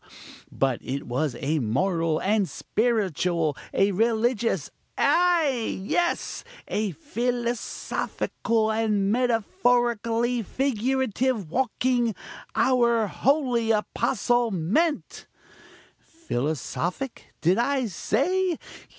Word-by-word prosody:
but 135 -3 0
it 140 +2 -4
was 130 +3 -1
a 155 +2 +1
moral, 165 - 0
a 210 +1 +2
spiritual, 180 - 0 0.2
a 195 +1 +2
religious, 230 +3 +1 0.3
ay! 330 -9 +2
yes! 345 - -1 0.2
a 210 -1 -1
philosophical 240 -3 -2
and 210 -3 +1
metaphorically 240 - +1
figurative 255 - -1
walking, 245 -2 +1 0.4
our 235 -3 +3
holy 250 0 +1
apostle 240 +2 +1
meant! 220 - -1 0.7
"Philosophic, 175 - -4
did 180 +6 +3
I 265 +1 +1
say? 340 - 0
230 Hz, 80 wpm, -25 LUFS, 195-255 Hz, 0.7 s, our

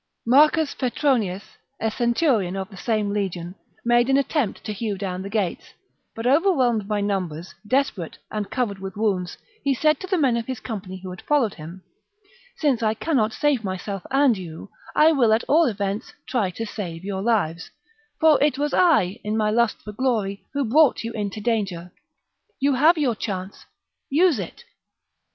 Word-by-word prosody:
Marcus 300 +5 +4
Petronius, 240 -7 0 0.4
a 225 - 0
centurion 235 - +1
of 190 +1 -5
the - - -11
same 210 +1 -1
legion, 180 -4 -3 0.3
made 240 +1 +3
an 270 - +4
attempt 280 -4 -1
to 210 - -4
hew 205 -1 -3
down 185 -1 -4
the 195 - -6
gates, 200 -4 -2 0.4
but, 225 - -5
overwhelmed 255 - +3
by 210 -1 0
numbers, 185 -5 -3
desperate, 250 - 0
and 210 -2 -3
covered 220 -6 -2
with 195 +1 -7
wounds, 195 -5 -1 0.3
he 275 -1 +2
said 305 +3 +2
to 375 - -7
the 375 -1 +1
men 270 -7 +3
of 230 - -4
his 260 -3 -4
company 190 -5 -6
who 185 - -6
had 180 - -9
followed 275 -8 +1
him, 170 +4 -10 0.4
" 485 +4 -30
Since 280 -7 +1
I 220 -1 +1
cannot 230 -5 +1
save 285 -2 +1
myself 195 0 -4
and 270 -2 +4
you, 175 0 -9 0.2
I 315 +1 +6
will, 250 -8 +3
at 220 - +2
all 325 +3 +4
events, 205 -2 -3
try 230 -7 0
to 225 +6 -5
save 180 -6 -6
your 195 -1 -3
lives, 195 -7 0 0.5
for 315 -2 +5
it 290 -2 +3
was 295 +1 -1
I, 260 - +3
in 215 +1 -1
my 215 -1 +1
lust 235 0 +2
for 210 - -7
glory, 210 -4 -1
who 280 -1 +1
l^rought 280 +4 +4
you 230 - -4
into 210 0 -4
danger. 195 -6 -2 0.7
You 280 +1 +2
have 310 +6 +5
your 275 -6 +1
chance: 195 -3 -6 0.4
use 315 - +3
it 185 - -7
220 Hz, 180 wpm, -23 LUFS, 195-275 Hz, 0.7 s, I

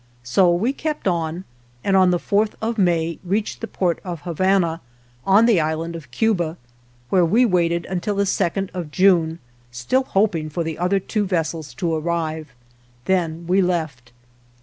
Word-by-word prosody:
So 175 +9 +3
we 210 +10 +1
kept 305 -5 -3
on, 170 0 -1 0.4
and 195 - +2
on 185 -1 +5
the 180 - +2
fourth 205 +4 0
of 225 0 -2
May 170 -3 +1
reached 205 +4 -2
the 225 - -4
port 175 -6 -1
of 175 -5 -6
Habana, 175 -1 +1 0.5
on 200 +4 +6
the 225 -7 +4
Island 160 +2 -2
of 155 -6 -9
Cuba, 175 - 0 0.5
where 185 -2 +4
we 220 +9 +4
waited 170 -4 +1
until 190 +3 -2
the 200 0 +1
second 195 +1 -1
of 175 -4 -5
June, 170 -2 +3 0.3
still 125 - 0
hoping 185 -8 0
for 170 +3 -2
the 160 -1 -5
other 180 +3 +2
two 205 +1 -2
vessels 160 -6 -2
to 165 +6 -1
arrive. 160 -2 -2 0.5
Then 170 -3 0
we 185 +3 +3
left. 155 -10 -2
175 Hz, 165 wpm, -21 LUFS, 160-195 Hz, 0.5 s, on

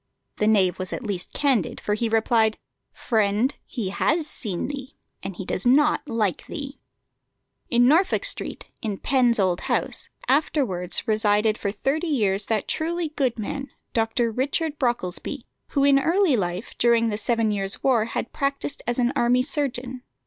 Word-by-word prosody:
The 210 - +1
knave 195 -5 +3
was 185 - -4
at - - -4
least 195 -4 -4
candid, 265 - +1
for 210 - -1
he 225 +2 0
replied: 225 0 +2 0.3
"Friend, 220 +3 +1
he 225 -7 -3
has 315 - +1
seen 205 - -4
thee, 275 -1 -7 0.3
and 195 -1 -6
he 190 - -6
does 185 - -1
not 295 +3 +3
like 215 -5 -1
thee." 280 -3 -7 0.9
In 245 0 +4
Norfolk 350 - +3
Street, - - -4 0.2
in 210 -3 -3
Penn's 245 -1 +2
old 185 -2 +1
house, - - -1 0.2
afterwards 255 - +1
resided 215 0 +2
for 200 -2 -2
thirty 275 - -1
years 205 -9 +1
that 220 -2 0
truly 335 +1 -1
good 270 -6 -1
man, 275 +6 -4 0.2
Dr. 230 +1 +1
Richard 290 +5 -1
Brocklesby, 240 +1 -2 0.2
who 280 - 0
in 280 -1 +5
early 335 0 +3
life, 180 0 -3
during 230 -1 +4
the 210 - -2
Seven 230 -2 +1
Years' 195 -1 -2
War, 240 -5 +3
had 235 +1 -4
practised 280 +1 -1
as 240 - 0
an 250 +1 +1
army 250 -1 +3
surgeon. 260 -3 -3
240 Hz, 160 wpm, -24 LUFS, 210-275 Hz, 0.9 s, in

